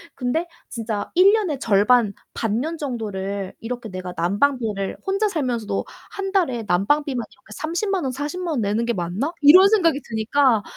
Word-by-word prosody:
근데 280 +7 -1 0.2
진짜 220 -3 -4
'1 385 +3 +6
년에 370 -11 0
절반 210 0 +3 0.2
반년 245 +10 -2
정도를 200 -7 -4
이렇게 235 0 -6
내가 185 -1 -6
난방비를 205 +2 0
혼자 395 +2 +1
살면서도 250 - -2 0.3
1 390 -1 -4
달에 285 - +1
난방비만 250 +8 +1
이렇게 260 - -24
300,000 355 +3 -2
원 260 - -1
400,000 300 +7 -4
원 250 - 0
내는 210 +3 0
게 235 - 0
맞나?' 185 - -2
이런 365 +7 +8
생각이 340 -9 +3
드니까 225 +1 +2
250 Hz, 290 characters per minute, -22 LUFS, 210-320 Hz, 0.3 s, 이런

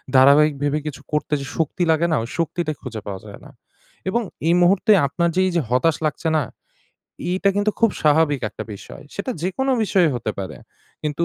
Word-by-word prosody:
ধারাবাহিক 140 +3 +6
ভেবে 145 +1 +1
কিছু 140 -2 -6
করতে 150 0 -1
যে - - -5
শক্তি 165 +3 0
লাগে 160 +2 +2
না? - - +3
ওই 115 - -7
শক্তিটা 170 -1 -1
খুঁজে 115 -5 -6
পাওয়া 95 -2 -4
যায় 100 -1 -10
না - - -12 0.6
এবং 235 +5 +1 0.3
এই 170 - +5
মুহূর্তে 190 +5 +4 0.2
আপনার 170 +5 0
যে - - +2
এই - - 0
যে 170 - +3
হতাশ 130 +6 +2
লাগছে 155 +2 -2
না? 150 - +1 0.9
এইটা 185 +2 +1
কিন্তু 205 +1 +2
খুব 230 -2 +5
স্বাভাবিক 150 -2 +3
একটা - - -7
বিষয় 100 - -11
সেটা 200 +6 -3
যেকোনো 265 +10 0
বিষয় 190 -4 +3
হতে 115 -3 -2
পারে। 95 -1 -5 0.5
কিন্তু 150 +2 -1
155 Hz, 190 wpm, -21 LUFS, 140-180 Hz, 0.9 s, ধারাবাহিক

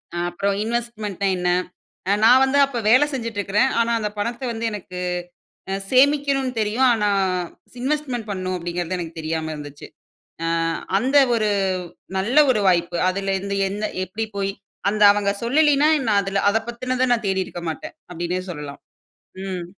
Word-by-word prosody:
அ-அப்பறம் 175 +3 -1
investment 225 -4 -3
ன்னா 195 - +2
என்ன? 180 0 0 0.6
அ-நான் 225 +5 +6
வந்து 270 +1 +2
அப்போ 265 -3 -4
வேலை 255 +6 +6
செஞ்சுட்ருக்குறேன், 230 0 0
ஆனா, 230 0 +2
அந்த 210 -1 -2
பணத்தை 240 +4 -3
வந்து 230 0 -4
எனக்கு 185 -3 -7 0.8
அ-சேமிக்கணும்ன்னு 265 +4 +2
தெரியும். 220 +5 +2
ஆனா, 210 -2 +1 0.7
இன்வெஸ்ட்மென்ட் 260 -5 -2
பண்ணனும் 185 -2 -3
அப்படீங்கிறது 175 +1 -3
எனக்கு 165 -1 -7
தெரியாம 160 0 -3
இருந்துச்சு. 145 -1 -9 0.6
அ - - 0 0.5
அந்த 265 +6 +2 0.2
ஒரு 215 -2 +1 0.7
நல்ல 215 +8 -1 0.2
ஒரு 215 - +1
வாய்ப்பு. 175 -1 +2
அதுலருந்து 195 +1 -2
என்ன? 210 +2 -3 0.2
எப்படி 215 +4 -4
போய் 195 0 -1 0.4
அந்த 210 +1 +1
அவங்க 205 -1 +1
சொல்லலீன்னா, 295 +3 +4 0.2
நான் 200 -2 +3
அதுல 195 0 -1
அத 220 - +2
பத்தினத 255 +2 -1
நான் 225 -3 -1
தேடியிருக்க 190 -2 -2
மாட்டேன். 160 - -7 0.2
அப்படீன்னே 175 +2 -3
சொல்லலாம். 150 -3 -8 0.7
ம். 185 -2 -4
205 Hz, 140 wpm, -22 LUFS, 185-245 Hz, 0.8 s, அ-நான்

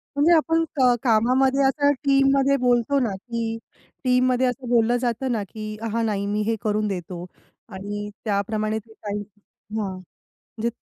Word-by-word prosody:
म्हणजे 300 +4 +4
आपण 325 +1 +3
क 250 -2 +5
कामामध्ये 260 +4 +3
असं 285 +1 +3
टीममध्ये 275 0 +4
बोलतो 250 +2 +2
ना, 240 -4 +1
की 225 +2 -4 0.5
टीममध्ये 255 0 +3
असं 250 0 -4
बोललं 240 0 +3
जातं 245 +1 -1
ना, 220 -4 -1
की 215 +2 -7 0.2
"हां, 230 0 +1
नाही, 200 -2 -1
मी 210 +1 -1
हे 225 - +2
करून 215 0 0
देतो." 180 -2 -5 0.5
आणि 205 +2 -5 0.2
त्याप्रमाणे 215 +1 -1
ते 220 +1 -19
काही 210 -1 -5 0.6
हां, 200 -3 -2 0.5
म्हणजे 230 +1 -4
230 Hz, 150 wpm, -23 LUFS, 215-260 Hz, 0.6 s, क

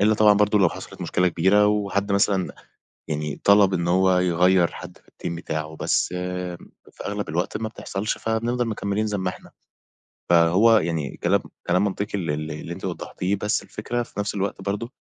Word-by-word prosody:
إلا 105 +2 +4
طبعًا 105 0 +6
برضه 105 +1 +3
لو 95 -3 +5
حصلِت - - -10
مشكلة 90 +1 +1
كبيرة، 95 +5 +3
وحد 100 -1 0
مثلًا 100 -2 +1 0.5
يعني 75 -1 -3
طَلب 100 -1 +6
إن 85 -1 -1
هو 95 +1 +4
يغيَّر 90 0 +3
حَدّ 90 -1 -10
في - - -30 0.2
الteam - - -1
بتاعه، 80 -1 -4
بس - - +1 0.8
في - - -10
أغلب 105 0 -3
الوقت 85 +4 -1
ما 110 0 -3
بتحصلش، 105 -1 -4
فبنفضل 115 +2 -1
مكمِّلين 105 0 -1
زي 105 -1 -2
ما 95 -1 -1
إحنا، - - -13 0.8
فهو، 90 +7 +5
يعني 80 -7 -2
كلام - - +2 0.3
كلام 90 +2 +3
منطقي 100 0 -2
ال 85 -6 -2
ال 75 +1 -3
اللي 75 - -6
أنتِ - - -8
وضَّحتِيه، 95 +3 -2
بس 105 +2 -1
الفكرة 120 +3 -3
في 110 - -10
نفس 105 0 -2
الوقت 100 0 -2
برضه، 105 +4 -3
100 Hz, 180 wpm, -24 LUFS, 85-105 Hz, 0.8 s, طبعًا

